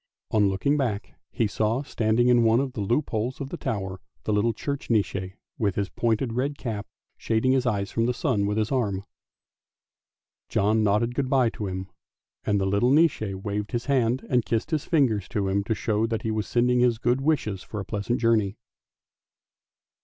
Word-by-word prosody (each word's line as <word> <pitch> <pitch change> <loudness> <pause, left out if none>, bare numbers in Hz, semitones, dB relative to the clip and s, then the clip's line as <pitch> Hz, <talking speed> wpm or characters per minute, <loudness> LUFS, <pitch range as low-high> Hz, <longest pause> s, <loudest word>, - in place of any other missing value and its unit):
On 105 -2 +4
looking 140 +10 +1
back 110 -7 -2 0.2
he 115 - 0
saw 110 +5 0
standing 115 -2 +1
in 120 -1 +5
one 115 +1 +4
of 135 -2 -2
the 110 - -4
loop 120 +9 0
holes 115 +4 -2
of 135 - -5
the - - -5
tower 95 -3 -4 0.2
the 105 - 0
little 105 +3 +2
church 140 +5 -4
Nisse 95 -4 0 0.2
with 100 -4 +1
his 100 -1 -1
pointed 115 +1 0
red 140 +4 -1
cap, 110 -7 -4 0.3
shading 115 +3 +1
his 130 -1 +2
eyes 100 -4 -1
from 115 0 +1
the 125 - +1
sun 120 - 0
with 105 +1 -1
his 110 +2 0
arm. 100 -7 0 1.4
John 110 +2 +2
nodded 105 +4 +2
good 135 0 -1
bye 130 -4 +3
to 105 - -5
him, 95 0 -4 0.6
and 105 -1 +1
the 95 - 0
little 100 +5 +2
Nisse 155 0 +4 0.2
waved 105 0 -3
his 120 0 -1
hand 130 -3 +1
and 125 -2 +2
kissed 115 +5 -2
his 155 -2 0
fingers 120 - +2
to 100 -2 -1
him 100 +1 +1
to 110 - 0
show 110 +1 0
that 115 -1 -2
he 110 - -1
was 110 -1 -2
sending 125 +1 +2
his 120 -2 +3
good 120 +3 +1
wishes 130 -10 0
for 105 - -6
a 100 - -5
pleasant 105 +3 -2
journey. 110 -3 +2
115 Hz, 195 wpm, -26 LUFS, 105-125 Hz, 1.4 s, in